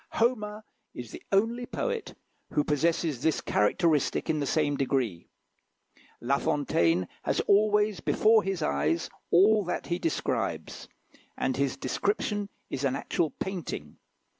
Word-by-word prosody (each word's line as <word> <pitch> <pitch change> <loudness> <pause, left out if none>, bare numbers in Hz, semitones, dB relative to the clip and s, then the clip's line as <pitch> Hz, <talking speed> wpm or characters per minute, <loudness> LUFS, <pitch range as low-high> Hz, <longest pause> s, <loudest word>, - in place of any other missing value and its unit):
Homer 215 -3 0 0.3
is 120 -3 -7
the - - -9
only 230 +5 +1
poet 475 -2 -3 0.4
who 150 - +3
possesses 155 -2 0
this 160 0 +2
characteristic 155 - +1
in 155 - -1
the 140 - -1
same 150 -2 +1
degree. 130 -10 -1 0.9
La 135 +3 +1
Fontaine 90 - +1
has - - 0
always 210 -1 +3
before 220 +6 +4
his 195 -4 -2
eyes 75 +4 0 0.2
all 205 +4 +5
that 175 - -3
he 175 - -2
describes, 330 - -2 0.5
and - - 0
his - - 0
description 205 - -1 0.2
is 135 - -4
an 135 -1 +1
actual 155 +3 -1
painting. 170 - -5
165 Hz, 130 wpm, -28 LUFS, 135-210 Hz, 0.9 s, all